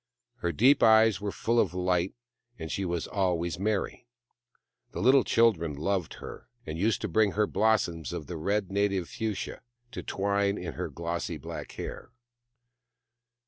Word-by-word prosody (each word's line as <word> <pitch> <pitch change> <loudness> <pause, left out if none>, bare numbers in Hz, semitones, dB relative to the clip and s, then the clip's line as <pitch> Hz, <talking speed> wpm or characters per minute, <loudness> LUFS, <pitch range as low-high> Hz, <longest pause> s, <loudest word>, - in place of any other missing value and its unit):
Her 85 - -1
deep 125 - +4
eyes 110 -2 +5
were 100 -1 -2
full 115 +4 +1
of 90 - +1
light, 90 0 0 0.4
and 80 - -6
she 100 - -2
was 85 -2 -2
always 85 -4 -1
merry. 105 +3 -2 0.9
The - - -4
little 130 0 +5
children 90 -10 +2
loved 90 +3 -1
her, - - -10 0.2
and 80 - -5
used 105 +1 +1
to 110 - -1
bring 105 +2 +2
her 105 0 +2
blossoms 95 - +1
of 75 - -5
the 85 - -6
red 100 +4 -1
native 100 -3 +1
fuchsia, 110 -3 -4 0.3
to - - -5
twine 100 0 0
in 85 -2 -5
her - - -4
glossy 85 0 -3
black 70 - -7
hair. - - -7
95 Hz, 155 wpm, -28 LUFS, 85-110 Hz, 0.9 s, eyes